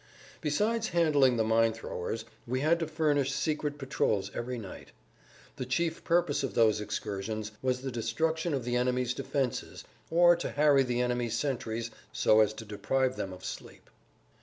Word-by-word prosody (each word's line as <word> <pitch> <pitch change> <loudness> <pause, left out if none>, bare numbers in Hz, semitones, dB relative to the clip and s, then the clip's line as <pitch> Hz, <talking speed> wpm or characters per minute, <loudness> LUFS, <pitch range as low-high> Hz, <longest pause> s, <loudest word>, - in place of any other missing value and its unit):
Besides 215 +10 +1
handling 145 -7 +3
the 110 - +3
mine 115 0 +3
throwers 110 0 -5 0.2
we 130 +2 -1
had 165 +3 +3
to 165 - -2
furnish 150 -3 +1
secret 150 0 -1
patrols 105 -7 -1
every 125 +1 -4
night. 100 -5 -9 0.6
The 130 - -3
chief 165 +5 -1
purpose 165 -4 +2
of 135 - -3
those 110 -2 +4
excursions 105 +1 -4
was 125 -1 0
the 135 - -3
destruction 160 +8 -1
of 130 - -3
the 120 0 -1
enemy's 125 0 +1
defenses 135 -2 -3 0.3
or 175 +1 +6
to 175 - -3
harry 145 -2 +4
the 125 -2 0
enemy's 120 -2 0
sentries 115 -4 -2 0.2
so 110 0 +4
as 110 -1 +4
to 110 - -9
deprive 130 +5 0
them 95 - -4
of 90 - -10
sleep. - - -8
125 Hz, 160 wpm, -30 LUFS, 115-150 Hz, 0.6 s, or